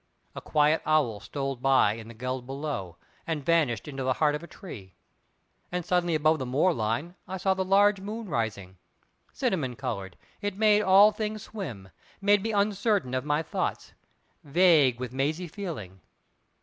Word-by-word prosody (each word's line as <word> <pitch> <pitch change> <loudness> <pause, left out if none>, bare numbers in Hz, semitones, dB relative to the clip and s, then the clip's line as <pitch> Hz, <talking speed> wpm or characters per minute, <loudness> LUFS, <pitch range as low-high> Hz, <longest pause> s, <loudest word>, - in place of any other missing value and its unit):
A - - -7
quiet 150 +1 +2
owl 150 -9 +1
stole 135 +2 -4
by 130 -4 +3
in 110 0 -9
the 115 - -11
geld 125 +2 -4
below, 135 - -5 0.3
and 155 -4 -3
vanished 160 -7 +1
into 135 -2 -5
the 130 0 +1
heart 150 +2 +2
of 150 - -3
a 170 - -10
tree. 100 - -11 0.8
And 180 -1 -3
suddenly 175 -2 +1
above 155 +1 +3
the 130 - -3
moor 150 +8 +2
line 115 +9 -2
I 190 +1 -4
saw 190 +1 +2
the 190 0 -1
large 200 +1 +4
moon 215 +2 -6
rising. 105 - -3 0.5
Cinnamon 130 -9 -1
coloured, 100 -8 -5 0.2
it 205 -2 -3
made 210 -1 +4
all 200 +2 +7
things 215 0 -4
swim, 130 - -7 0.3
made 205 0 +3
me 225 +2 -2
uncertain 200 - +1
of 130 +2 -1
my 150 +2 +1
thoughts, - - -3 0.5
vague 150 -5 +4
with 125 -1 -5
mazy 155 +7 -1
feeling. 150 - -7
150 Hz, 165 wpm, -27 LUFS, 125-190 Hz, 0.8 s, all